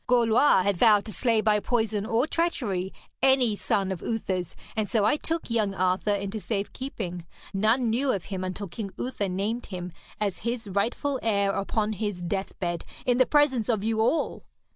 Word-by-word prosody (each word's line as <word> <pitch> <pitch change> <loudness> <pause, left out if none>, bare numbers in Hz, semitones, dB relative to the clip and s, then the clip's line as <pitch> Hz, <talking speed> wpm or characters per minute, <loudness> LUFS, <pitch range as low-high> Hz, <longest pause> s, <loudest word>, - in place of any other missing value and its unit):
Gorlois 235 -3 +4
had 200 -1 +1
vowed 210 0 +5
to 215 - -6
slay 230 -4 +2
by 215 -1 +3
poison 220 -2 0
or 230 +3 +2
treachery 235 - -1 0.3
any 260 -5 +4
son 195 -1 0
of 185 - -4
Uther's, 185 -6 -2 0.2
and 215 -2 -1
so 215 -3 +2
I 215 - +4
took 330 +2 -3
young 210 -4 +1
Arthur 185 +3 +1
into 200 +2 -3
safe 200 -1 -3
keeping. 180 -10 -5 0.3
None 220 +4 +2
knew 260 +4 +2
of 195 -7 -2
him 190 -2 -4
until 185 +2 -4
King 200 +3 -5
Uther 210 -6 -2
named 205 +6 -2
him 180 -2 -6 0.3
as 205 -3 -1
his 235 0 -3
rightful 240 +8 -1
heir 200 -3 +2
upon 210 +2 -1
his 205 -2 -3
deathbed 175 -1 -3 0.2
in 245 0 +2
the 255 - +5
presence 270 -7 +3
of 215 -4 +1
you 220 0 0
all. 275 +8 0
215 Hz, 180 wpm, -27 LUFS, 195-235 Hz, 0.3 s, vowed